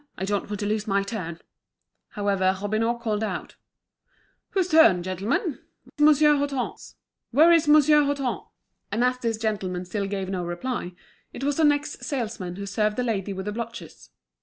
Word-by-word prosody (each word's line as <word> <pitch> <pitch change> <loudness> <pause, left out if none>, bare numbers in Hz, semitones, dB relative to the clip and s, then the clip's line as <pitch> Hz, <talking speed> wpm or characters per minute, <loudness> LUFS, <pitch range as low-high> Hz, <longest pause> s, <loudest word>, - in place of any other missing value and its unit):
I 190 - -2
don't 205 0 -2
want 205 -1 -4
to - - -1
lose 210 +1 -1
my 200 -1 +1
turn!" 185 -6 -5 0.7
However, 195 -2 +1
Robineau 215 +4 0
called 220 -2 -2
out: 220 - -4 0.9
"Whose 375 -3 0
turn, 225 - +6
gentlemen? 210 - -2 0.4
Monsieur 300 0 +5
Hutin's? 280 -3 -3 0.3
Where's 325 +4 +5
Monsieur 300 0 +6
Hutin?" 280 -3 -1 0.5
And 225 +4 +1
as 250 0 +1
this 230 -3 -1
gentleman 195 -5 -2
still 200 +2 -3
gave 195 -1 -3
no 185 -2 -3
reply, 175 +2 -4 0.4
it 270 - -7
was 285 0 0
the 325 - +2
next 290 0 +1
salesman 220 -9 -4
who 200 +1 -6
served 210 +2 0
the 250 - 0
lady 205 -4 -2
with 190 -1 -5
the 210 - -2
blotches. 230 +1 -8
220 Hz, 160 wpm, -25 LUFS, 195-275 Hz, 0.9 s, turn